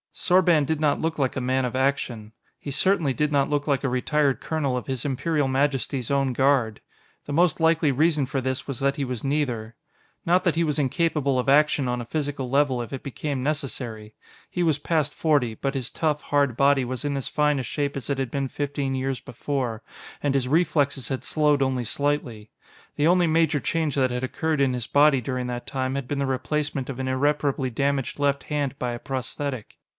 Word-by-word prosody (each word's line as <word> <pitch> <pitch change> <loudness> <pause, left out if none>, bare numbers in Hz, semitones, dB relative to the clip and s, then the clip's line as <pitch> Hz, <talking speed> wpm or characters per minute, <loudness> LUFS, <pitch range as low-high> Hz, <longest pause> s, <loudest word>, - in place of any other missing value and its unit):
Sorban 175 -4 +3
did 155 +2 -1
not 145 -2 +2
look 160 0 -1
like 135 -2 0
a 130 - -2
man 130 +1 +1
of 125 0 -2
action; 125 -5 -1 0.3
he 140 - -6
certainly 165 -2 +2
did 150 +2 0
not 140 -2 +2
look 145 0 -1
like 140 -2 +1
a 135 - +1
retired 135 +1 +1
colonel 145 -5 -1
of 125 - -4
His 130 -1 -3
Imperial 145 +1 0
Majesty's 135 -2 0
Own 135 -2 +1
Guard. 130 -4 +2 0.4
The 145 - -5
most 175 +3 +3
likely 160 -2 +3
reason 150 +1 +2
for 135 +1 -2
this 130 0 -3
was 140 -4 -4
that 140 0 +1
he 140 - -1
was 125 -3 -4
neither. 125 -6 -1 0.5
Not 180 +2 +3
that 175 -4 +1
he 170 - +2
was 150 -2 0
incapable 145 -1 +1
of 125 - -2
action 145 -1 +4
on 125 0 -1
a - - -6
physical 140 -1 -3
level 135 -2 +2
if 120 - -7
it 135 - -6
became 140 0 -3
necessary; 120 -7 -4 0.3
he 180 - -1
was 155 -4 +2
past 155 -2 0
forty, 145 -8 +1
but 135 +5 -3
his 130 -3 -3
tough, 150 -2 -1
hard 140 -5 +1
body 140 -1 +4
was 125 +1 -4
in 145 -1 -1
as 135 - -3
fine 150 -1 +1
a - - -2
shape 140 +2 -2
as 140 - -5
it 140 - 0
had 135 -3 -2
been 140 -1 -1
fifteen 140 -1 -2
years 130 0 -2
before, 125 -2 -3 0.4
and 145 -2 +1
his 135 -2 +1
reflexes 145 -4 +1
had 130 -2 -3
slowed 150 -2 +2
only 130 -2 +1
slightly. 120 -5 -2 0.5
The 145 - +2
only 175 0 +4
major 160 -2 +2
change 160 -1 -1
that 130 -2 +2
had 125 +1 -3
occurred 155 +3 -1
in 135 -2 +3
his 125 -2 -3
body 145 -2 +4
during 125 +1 -3
that 120 0 -5
time 130 -1 -2
had 140 -3 -3
been 145 +1 -2
the 140 - +1
replacement 140 +1 -2
of 135 -1 -5
an 130 - -2
irreparably 140 0 +1
damaged 140 +2 -1
left 140 -1 +1
hand 145 -2 -2
by 125 -1 -1
a 120 - -5
prosthetic. 130 -1 -5
140 Hz, 210 wpm, -25 LUFS, 130-150 Hz, 0.5 s, action